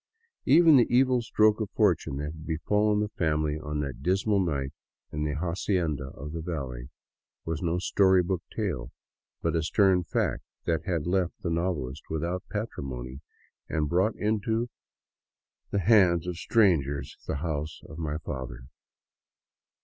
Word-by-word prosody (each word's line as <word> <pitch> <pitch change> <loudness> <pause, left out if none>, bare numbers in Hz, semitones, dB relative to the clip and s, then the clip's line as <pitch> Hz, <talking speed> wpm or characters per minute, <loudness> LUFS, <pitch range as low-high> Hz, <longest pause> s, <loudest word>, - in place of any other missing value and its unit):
Even 160 +1 +7
the 120 - +5
evil 130 0 +4
stroke 110 -1 +3
of 105 - -2
fortune 70 - +2
that 75 +1 -3
had 80 0 -11
befallen 105 +6 +1
the 105 - -1
family 75 -4 0
on 75 -1 -3
that 70 -3 -5
dismal 95 +5 +2
night 70 -7 -1 0.4
in 75 +1 -2
the 75 -1 -1
" - - -3
hacienda 85 -4 -1
of 75 +2 -7
the 80 +1 -4
valley 65 -7 -5 0.3
" - - -62
was 80 -1 -3
no 85 -1 0
story 95 0 +4
book 90 0 -1
tale, 85 - -3 0.5
but - - +1
a 80 - +2
stern 95 +2 +3
fact - - -1 0.2
that 80 -1 0
had 85 -5 -1
left 90 0 0
the 85 - -1
novelist 80 -5 -2
without 85 +3 -2
patrimony 65 - -5 0.5
and 75 -3 0
brought 95 +6 +2
into 110 +3 0 1.0
the 100 - 0
hands 90 -5 +5
of 90 -1 -3
strangers 80 - +2
" - - -23
the - - -1
house 75 0 -3
of 80 0 -10
my 75 -2 -2
fathers." 65 -5 -6
85 Hz, 155 wpm, -28 LUFS, 75-100 Hz, 1.0 s, Even